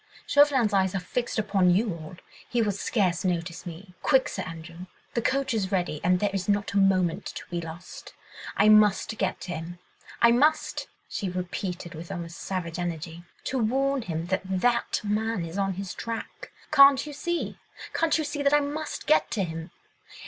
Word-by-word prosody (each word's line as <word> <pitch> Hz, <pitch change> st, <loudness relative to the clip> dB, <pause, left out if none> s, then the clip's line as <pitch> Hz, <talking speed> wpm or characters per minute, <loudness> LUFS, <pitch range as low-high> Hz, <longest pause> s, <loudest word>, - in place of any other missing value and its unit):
Chauvelin's 275 Hz, -7 st, +4 dB
eyes 190 Hz, -1 st, +2 dB
are -, -, +1 dB
fixed 235 Hz, +7 st, -3 dB
upon 200 Hz, -4 st, +3 dB
you 195 Hz, +3 st, +2 dB
all, 160 Hz, +1 st, -9 dB, 0.3 s
he 245 Hz, -, 0 dB
will 215 Hz, -3 st, +2 dB
scarce 190 Hz, -3 st, 0 dB
notice 175 Hz, -1 st, -2 dB
me. 180 Hz, +3 st, -9 dB
Quick, 265 Hz, -3 st, +3 dB
Sir -, -, -4 dB
Andrew!—the 170 Hz, +6 st, -7 dB
coach 265 Hz, +2 st, 0 dB
is 200 Hz, -4 st, -1 dB
ready, 175 Hz, -6 st, -1 dB
and 180 Hz, +1 st, +3 dB
there 205 Hz, 0 st, +1 dB
is 195 Hz, 0 st, -2 dB
not 200 Hz, 0 st, +1 dB
a 200 Hz, -, +3 dB
moment 185 Hz, -3 st, +2 dB
to -, -, -7 dB
be 175 Hz, -1 st, -2 dB
lost.... 165 Hz, +2 st, -9 dB, 0.4 s
I 210 Hz, -, +5 dB
must 215 Hz, 0 st, +5 dB
get 190 Hz, -1 st, 0 dB
to 180 Hz, -, -5 dB
him! 170 Hz, +1 st, -6 dB, 0.4 s
I 235 Hz, -, +6 dB
must!" 295 Hz, +6 st, +2 dB, 0.2 s
she 195 Hz, -, -3 dB
repeated 180 Hz, 0 st, -4 dB
with 165 Hz, +3 st, -8 dB
almost 170 Hz, -2 st, -6 dB
savage 180 Hz, -3 st, -4 dB
energy, 170 Hz, 0 st, -4 dB, 0.2 s
"to 260 Hz, -, -1 dB
warn 270 Hz, +4 st, +1 dB
him 165 Hz, -5 st, -3 dB
that 190 Hz, -, +1 dB
that 235 Hz, +6 st, +1 dB
man 210 Hz, -2 st, -1 dB
is 165 Hz, +4 st, -5 dB
on 195 Hz, -1 st, +1 dB
his 190 Hz, 0 st, -5 dB
track.... 230 Hz, -1 st, -6 dB, 0.2 s
Can't 275 Hz, 0 st, +7 dB
you 300 Hz, -, -7 dB
see—can't 330 Hz, 0 st, -2 dB
you 315 Hz, -, 0 dB
see, 290 Hz, 0 st, -3 dB
that 285 Hz, +1 st, +4 dB
I -, -, +6 dB
must 295 Hz, +2 st, -4 dB
get 310 Hz, -, +3 dB
to 205 Hz, -, 0 dB
him 165 Hz, 0 st, -5 dB
195 Hz, 180 wpm, -27 LUFS, 175-235 Hz, 0.4 s, Can't